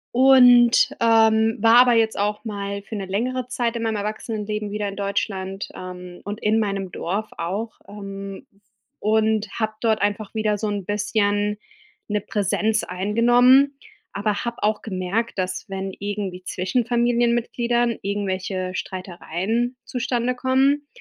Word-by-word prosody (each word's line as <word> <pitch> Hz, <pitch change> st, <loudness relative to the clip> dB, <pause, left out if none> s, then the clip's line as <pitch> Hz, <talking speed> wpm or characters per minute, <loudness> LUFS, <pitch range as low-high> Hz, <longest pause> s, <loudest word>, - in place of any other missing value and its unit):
Und, 245 Hz, -2 st, +7 dB
ähm, 225 Hz, -1 st, +4 dB
war 225 Hz, +2 st, +5 dB
aber 250 Hz, -1 st, +5 dB
jetzt 225 Hz, -1 st, +2 dB
auch 210 Hz, +1 st, -1 dB
mal 200 Hz, -2 st, -4 dB
für 220 Hz, -, -7 dB
'ne 200 Hz, -2 st, -4 dB
längere 245 Hz, +6 st, -2 dB
Zeit 245 Hz, -2 st, -1 dB
in 230 Hz, -, -3 dB
meinem 220 Hz, -1 st, -1 dB
Erwachsenenleben 210 Hz, 0 st, -4 dB
wieder 210 Hz, 0 st, -2 dB
in 200 Hz, -, -5 dB
Deutschland, 195 Hz, -1 st, -3 dB
ähm, 180 Hz, -1 st, -9 dB
und 205 Hz, +2 st, -6 dB
in 215 Hz, +1 st, +2 dB
meinem 195 Hz, -3 st, -2 dB
Dorf 205 Hz, +7 st, -3 dB
auch, 200 Hz, +7 st, -4 dB
ähm, 195 Hz, +1 st, -8 dB, 0.5 s
und 220 Hz, 0 st, +1 dB
habe 220 Hz, -1 st, -1 dB
dort 220 Hz, -2 st, +1 dB
einfach 205 Hz, 0 st, -1 dB
wieder 215 Hz, -1 st, 0 dB
so 215 Hz, -, -2 dB
'n 205 Hz, -3 st, -3 dB
bisschen 205 Hz, 0 st, 0 dB, 0.5 s
'ne 210 Hz, -1 st, -1 dB
Präsenz 215 Hz, +2 st, 0 dB
eingenommen, 240 Hz, +8 st, +4 dB, 0.4 s
aber 205 Hz, +2 st, -1 dB
habe 235 Hz, -2 st, -5 dB
auch 210 Hz, 0 st, +1 dB
gemerkt, 205 Hz, +3 st, -2 dB
dass 185 Hz, -1 st, -2 dB
wenn 195 Hz, -1 st, -4 dB
irgendwie 200 Hz, -2 st, -4 dB
zwischen 190 Hz, +6 st, -1 dB
Familienmitgliedern 240 Hz, 0 st, +1 dB
irgendwelche 190 Hz, -2 st, -2 dB
Streitereien 190 Hz, +6 st, -3 dB
zustande 245 Hz, 0 st, -1 dB
kommen, 270 Hz, +3 st, +2 dB
210 Hz, 135 wpm, -23 LUFS, 200-235 Hz, 0.5 s, Und